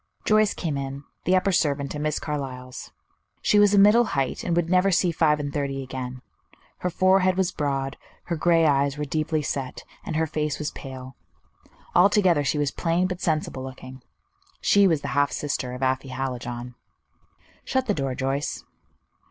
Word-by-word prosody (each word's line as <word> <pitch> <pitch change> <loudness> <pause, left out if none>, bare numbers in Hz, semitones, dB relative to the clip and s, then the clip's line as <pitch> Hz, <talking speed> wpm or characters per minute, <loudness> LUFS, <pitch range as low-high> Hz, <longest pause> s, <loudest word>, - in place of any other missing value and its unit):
Joyce 215 -1 +3
came 155 -5 -2
in 135 +1 -5 0.2
the 185 - +3
upper 185 +1 +2
servant 140 -5 0
at 150 - -4
Miss 155 0 -1
Carlyle's. 130 -4 -6 0.5
She 210 - +3
was 205 0 +5
of 200 - +7
middle 220 +4 +6
height, 135 -2 -1
and 170 - 0
would 175 -1 +1
never 185 +2 +3
see 180 -1 +2
five 155 -2 +2
and 145 -1 -4
thirty 140 -2 -2
again; 130 -1 -6 0.6
her 180 - -1
forehead 185 +1 +3
was 190 -1 +1
broad, 135 -3 -2 0.3
her 170 - -3
gray 165 0 +3
eyes 140 -1 +2
were 150 - -2
deeply 155 +1 -1
set, 135 -2 -4 0.2
and - - -4
her 160 +1 +2
face 150 -1 -2
was 150 - -3
pale. 130 -1 -9 0.8
Altogether 185 -4 +4
she 145 - 0
was 145 -2 0
plain, 170 +2 0
but 185 -1 -4
sensible 155 -5 -1
looking. 130 0 -9 0.6
She 200 -1 +4
was 160 -5 +1
the - - -4
half 145 0 +2
sister 135 -4 -3
of 125 +1 -5
Afy 130 +1 0
Hallijohn. 125 -2 -5 0.9
"Shut 260 -1 0
the 210 - +1
door, 135 -6 -2
Joyce." 135 +3 -2
150 Hz, 175 wpm, -25 LUFS, 135-180 Hz, 0.9 s, of